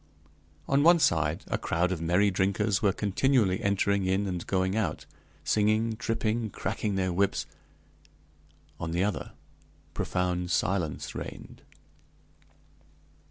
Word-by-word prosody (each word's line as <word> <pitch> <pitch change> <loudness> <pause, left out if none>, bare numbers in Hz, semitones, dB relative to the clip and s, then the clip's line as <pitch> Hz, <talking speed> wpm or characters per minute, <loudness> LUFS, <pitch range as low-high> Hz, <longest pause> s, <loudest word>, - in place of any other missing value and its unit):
On 140 +1 +3
one 170 +3 +7
side, 80 - +1
a - - -1
crowd 85 +2 0
of 85 -3 -3
merry 90 +5 +3
drinkers 100 +2 +1
were 100 - +3
continually 105 0 +1
entering 100 -1 +1
in 95 +2 +1
and 90 -3 -4
going 95 0 0
out, 110 -3 -2 0.4
singing, 110 +2 +2
tripping, 115 0 -1
cracking 100 +1 -3
their 95 -2 0
whips; 100 +2 +1 1.3
on 85 -1 -4
the 90 +2 +1
other, 105 0 -3 0.6
profound 90 -1 -1
silence 90 -4 -1
reigned. - - -8
95 Hz, 115 wpm, -28 LUFS, 90-110 Hz, 1.3 s, one